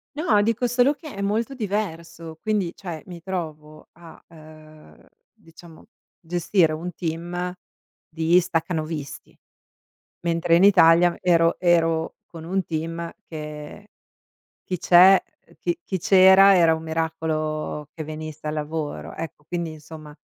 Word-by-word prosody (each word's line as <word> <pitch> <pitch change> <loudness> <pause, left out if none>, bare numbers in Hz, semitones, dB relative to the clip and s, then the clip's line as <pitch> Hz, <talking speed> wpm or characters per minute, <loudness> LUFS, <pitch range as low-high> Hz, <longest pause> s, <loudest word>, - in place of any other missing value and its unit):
No, 225 -10 +2
dico 230 +3 0
solo 245 +4 +3
che 305 -2 -11
è 200 - -5
molto 220 +6 -1
diverso, 170 -7 -5
quindi 205 -6 -1
cioè 170 -5 -7
mi 175 -2 -10
trovo 155 -5 -7
a, 170 -1 -15
uhm, 155 - -16 0.3
diciamo 165 0 -17 0.3
gestire 175 -1 +1
un 175 +3 -5
team 175 +2 -4 0.6
di 160 +2 +2
stacanovisti, 160 -4 -4 0.8
mentre 170 0 +1
in 180 - +4
Italia 175 -3 +5
ero 165 -2 +3
ero 165 -2 +1
con 165 -2 -11
un 190 +3 -1
team 165 +1 -4 0.2
che 150 +5 -9 0.8
chi 180 - -4
c'è 185 +3 +7 0.4
chi 345 -1 -2
chi 190 - -3
c'era 190 +2 +6
era 165 -2 +4
un 160 - -9
miracolo 155 -2 -3
che 155 - -7
venisse 155 0 -8
al 150 - -2
lavoro, 150 - -5
ecco. 165 -2 -7
Quindi 170 -1 -4
insomma, 155 -1 -12
165 Hz, 125 wpm, -23 LUFS, 155-185 Hz, 0.8 s, c'è